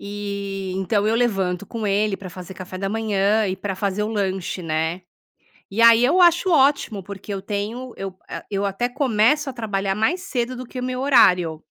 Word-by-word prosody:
Eh, 200 -2 -5
então 200 +2 0
eu 220 - +2
levanto 195 -6 0
com 225 -2 -4
ele 205 0 +1
pra 185 -2 -9
fazer 185 +2 -9
café 185 0 -8
da 195 0 -2
manhã 215 -1 +1
e 185 - -1
pra 190 0 -4
fazer 200 +1 -1
o 210 - -1
lanche 190 -4 -2
né? 160 +3 -2 0.7
E 225 +4 0
aí 230 +1 +7
eu 355 +7 +3
acho 350 +2 +4
ótimo 275 -8 +3
porque 200 +1 -7
eu 195 - -4
tenho 220 +5 -4
eu 190 -1 -6
ah, - - -6
eu 200 0 -1
até 200 +5 -1
começo 265 +2 +2
a - - -6
trabalhar 200 -4 -2
mais 320 +13 0
cedo 255 -9 -2
do 255 +1 -7
que 250 - -8
o 250 - -4
meu 255 0 -3
horário 180 - +4
205 Hz, 200 wpm, -22 LUFS, 195-240 Hz, 0.7 s, aí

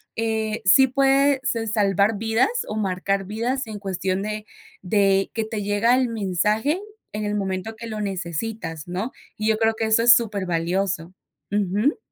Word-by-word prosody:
eh, 220 -1 -1
sí 265 +7 +7
puede 275 +1 +3
s 230 -4 -1
salvar 205 0 +2
vidas 225 - +2 0.2
o 215 - -4
marcar 195 -1 -1
vidas 235 +6 -2
en 210 -2 -6
cuestión 190 -1 -2
de 215 0 -4 0.4
de 195 0 +2
que 225 - -1
te 215 -2 -4
llega 205 +4 +3
el 255 -1 +2
mensaje 215 - 0 0.3
en 210 0 -3
el 205 - -1
momento 195 +2 -3
que 230 +1 -8
lo 215 -1 -5
necesitas, 175 -3 -4
¿no? 190 +8 -3 0.3
Y 215 - -2
yo 220 -1 +3
creo 225 0 +2
que 220 - -1
eso 220 +1 +3
es 240 - +9
súper 210 -5 0
valioso, 175 +1 -1 0.4
ujú. 205 - +1
210 Hz, 170 wpm, -23 LUFS, 195-225 Hz, 0.4 s, es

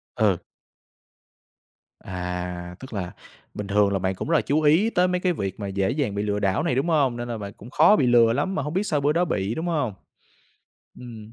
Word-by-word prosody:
Ừ. 105 -6 +2 1.6
À, 90 -1 -5
tức 130 -3 -10
là 90 -3 -4 0.4
bình 105 -1 -5
thường 100 0 +2
là 95 - 0
bạn 95 +1 -1
cũng 150 - -5
rất 165 - +3
là - - +4
chú 150 +3 +1
ý 160 +9 +4
tới 180 -4 +2
mấy 180 0 0
cái 180 -2 +1
việc 95 - -4
mà 100 - -4
dễ 95 0 0
dàng 135 -8 -1
bị 100 - -1
lừa 105 0 -1
đảo 95 -1 +1
này, 125 - 0
đúng 135 +6 0
hông? 135 -7 +2
Nên 120 0 -4
là 115 -2 -4
bạn 100 -1 -7
cũng 115 - -13
khó 210 - +5
bị 130 - +2
lừa 115 -1 +5
lắm 170 +9 -1
mà 145 - 0
hông 150 +2 -4
biết 195 +3 +1
sao 150 -7 0
bữa 145 +2 +2
đó 175 +2 +2
bị, 105 - -2
đúng 160 - -3
hông? 145 - -1 1.1
Ừm. 115 -3 -10
115 Hz, 235 wpm, -24 LUFS, 100-150 Hz, 1.6 s, khó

